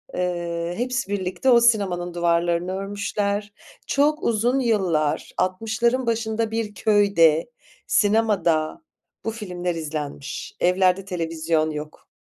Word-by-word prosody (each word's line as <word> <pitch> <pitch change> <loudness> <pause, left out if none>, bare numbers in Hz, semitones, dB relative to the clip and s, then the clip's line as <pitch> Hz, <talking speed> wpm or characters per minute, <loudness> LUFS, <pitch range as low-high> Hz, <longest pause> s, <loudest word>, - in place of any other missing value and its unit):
Eee, 175 -1 -2
hepsi 240 -3 -2
birlikte 190 +5 -1
o 240 - +7
sinemanın 190 -7 +2
duvarlarını 170 +1 +1
örmüşler. 200 +1 -2 0.3
Çok 300 +2 +2
uzun 235 +4 +2
yıllar, 185 - 0
60'ların 225 +7 0
başında 225 -1 -1
bir 225 -2 -2
köyde 200 -4 +3 0.4
sinemada 205 - +2 0.4
bu 225 - 0
filmler 180 -5 -4
izlenmiş. 150 -3 -5
Evlerde 185 +1 +2
televizyon 165 -3 -1
yok. 150 0 -8
190 Hz, 105 wpm, -23 LUFS, 170-220 Hz, 0.4 s, o